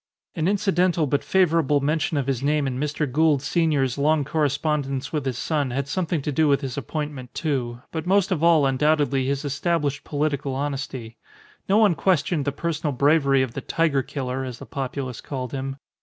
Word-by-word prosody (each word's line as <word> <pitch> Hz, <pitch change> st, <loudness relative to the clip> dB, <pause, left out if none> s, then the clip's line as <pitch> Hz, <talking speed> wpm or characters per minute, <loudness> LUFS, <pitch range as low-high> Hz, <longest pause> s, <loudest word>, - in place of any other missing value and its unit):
An 165 Hz, -1 st, -1 dB
incidental 185 Hz, -4 st, +2 dB
but 145 Hz, 0 st, 0 dB
favourable 165 Hz, -6 st, +3 dB
mention 150 Hz, +2 st, 0 dB
of 140 Hz, -, 0 dB
his 130 Hz, -2 st, -1 dB
name 145 Hz, +1 st, +1 dB
in 130 Hz, -1 st, -2 dB
Mr. 150 Hz, +1 st, -1 dB
Gould 145 Hz, 0 st, +2 dB
senior's 145 Hz, -6 st, +1 dB
long 150 Hz, 0 st, +2 dB
correspondence 145 Hz, -2 st, -1 dB
with 150 Hz, -3 st, -1 dB
his 125 Hz, -2 st, -2 dB
son 145 Hz, -2 st, -1 dB
had 135 Hz, +2 st, -2 dB
something 165 Hz, -1 st, -1 dB
to 150 Hz, -, -1 dB
do 155 Hz, +2 st, +2 dB
with 140 Hz, -1 st, +3 dB
his 135 Hz, -3 st, -4 dB
appointment, 140 Hz, -1 st, -5 dB
too; 125 Hz, -5 st, -2 dB
but 160 Hz, +1 st, -4 dB
most 195 Hz, 0 st, +3 dB
of 165 Hz, -4 st, 0 dB
all 165 Hz, -4 st, +5 dB
undoubtedly 135 Hz, -1 st, +2 dB
his 140 Hz, +1 st, -1 dB
established 145 Hz, 0 st, -1 dB
political 145 Hz, -2 st, -1 dB
honesty. 135 Hz, -5 st, -4 dB, 0.5 s
No 200 Hz, -, +5 dB
one 215 Hz, -4 st, +5 dB
questioned 165 Hz, -4 st, +1 dB
the 140 Hz, -, +1 dB
personal 155 Hz, 0 st, -2 dB
bravery 140 Hz, 0 st, +3 dB
of 125 Hz, -3 st, -4 dB
the 135 Hz, -, -4 dB
Tiger 155 Hz, -1 st, +1 dB
killer, 130 Hz, 0 st, -4 dB
as 125 Hz, -2 st, -6 dB
the -, -, -10 dB
populace 130 Hz, -2 st, -4 dB
called 130 Hz, -3 st, -5 dB
him. 135 Hz, 0 st, -4 dB
145 Hz, 185 wpm, -24 LUFS, 135-160 Hz, 0.5 s, all